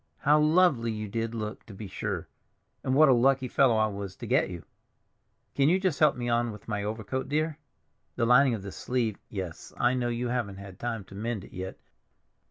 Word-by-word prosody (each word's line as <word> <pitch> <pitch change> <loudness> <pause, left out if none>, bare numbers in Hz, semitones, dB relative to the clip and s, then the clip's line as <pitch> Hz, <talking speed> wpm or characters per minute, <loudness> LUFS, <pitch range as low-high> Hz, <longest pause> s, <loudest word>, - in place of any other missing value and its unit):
How 150 +2 +5
lovely 150 -7 +4
you 110 -1 -4
did 115 +2 -3
look, 105 -1 -5
to 105 - -10
be 105 - -7
sure, - - -4 0.6
and 130 - +1
what 155 +2 +7
a 135 - +6
lucky 130 +2 +3
fellow 125 -1 +4
I 110 - +4
was 100 -2 -5
to - - -8
get - - +2
you! 85 -4 -8 0.9
Can 140 +1 +3
you 185 +3 +3
just 185 -7 0
help 150 -2 +5
me 120 -1 -4
on 120 0 +1
with 105 -1 -12
my 105 -2 -2
overcoat, 110 +4 -3
dear? 155 +1 0 0.6
The 115 - +1
lining 125 +1 +5
of 100 - -7
this 100 - -7
sleeve—Yes, 105 -7 -4
I 120 +1 +3
know 125 -2 0
you 120 +1 -2
haven't 115 -6 -2
had 100 -1 -10
time 115 -3 -3
to 95 - -15
mend 110 0 -3
it - - -14
yet. 95 +1 -6
115 Hz, 205 wpm, -28 LUFS, 105-130 Hz, 0.9 s, what